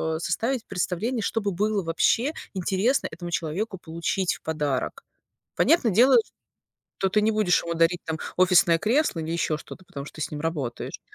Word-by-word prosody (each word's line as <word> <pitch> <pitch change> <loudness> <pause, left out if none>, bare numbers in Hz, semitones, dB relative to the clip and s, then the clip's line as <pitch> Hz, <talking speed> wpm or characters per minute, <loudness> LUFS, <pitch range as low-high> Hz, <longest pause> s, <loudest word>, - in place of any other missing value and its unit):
а, - - -3
составить 230 +9 -1
представление, 200 +6 -2
что 225 - -1
бы 205 -1 -1
было 205 +1 0
вообще 225 - +2 0.2
интересно 195 +8 +1
этому 175 -1 -6
человеку 175 +7 -2
получить 170 +3 -2
в - - -16
подарок. 155 - -2 0.5
Понятно 320 -9 +4
дело, 240 +7 +5
ч 455 - +3 0.7
то 190 - +1
ты 210 - +3
не 220 +1 +3
будешь 210 -4 +2
ему 170 0 -2
дарить 165 +1 +2
там 160 0 -3 0.2
офисное 180 -2 +5
кресло 225 - +1
или 160 +1 -4
ещё 160 -2 0
что-то, 185 - -11
потому 140 -3 -8
что - - -12
ты 155 - -4
с - - -7
ним 150 - -4
работаешь. 150 -7 -4
180 Hz, 185 wpm, -25 LUFS, 165-215 Hz, 0.7 s, дело